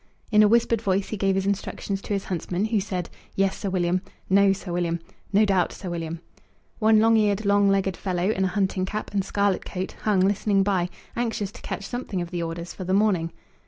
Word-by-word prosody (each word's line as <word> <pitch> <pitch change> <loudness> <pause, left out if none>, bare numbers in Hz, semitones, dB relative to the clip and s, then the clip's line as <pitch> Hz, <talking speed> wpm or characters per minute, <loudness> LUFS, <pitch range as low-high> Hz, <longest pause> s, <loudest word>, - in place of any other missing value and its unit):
In 210 -1 +6
a 210 - +7
whispered 230 0 +3
voice 195 -2 0
he - - -2
gave 195 -1 +1
his 195 0 0
instructions 200 0 -2
to 205 - -4
his 195 -1 -1
huntsman, 180 +2 -2
who 220 -1 +1
said, 185 -3 -3 0.3
"Yes, 195 0 +2
Sir 200 - -3
William," 180 -1 +1 0.3
"No, 200 0 +6
Sir 195 -1 -4
William," 170 -1 0 0.3
"No 210 +2 +5
doubt, 190 -4 +2
Sir 185 - -6
William." 165 -1 -4 0.6
One 220 -1 +5
long 225 +1 +5
eared, 210 -1 +2
long 200 0 +4
legged 195 -2 +1
fellow, 185 +2 0
in 190 -3 0
a 185 - -3
hunting 190 -1 +1
cap 210 +3 -4
and 200 -1 +1
scarlet 200 -1 0
coat, 185 0 -4
hung 205 -4 +2
listening 200 +1 +2
by, 185 -3 +1 0.3
anxious 225 -4 -2
to - - -13
catch 200 - -5
something 240 -6 -4
of 175 -1 -4
the 175 -1 -2
orders 170 +1 -5
for 185 - -7
the 185 +1 +1
morning. 190 -6 +2
195 Hz, 215 wpm, -25 LUFS, 185-205 Hz, 0.6 s, a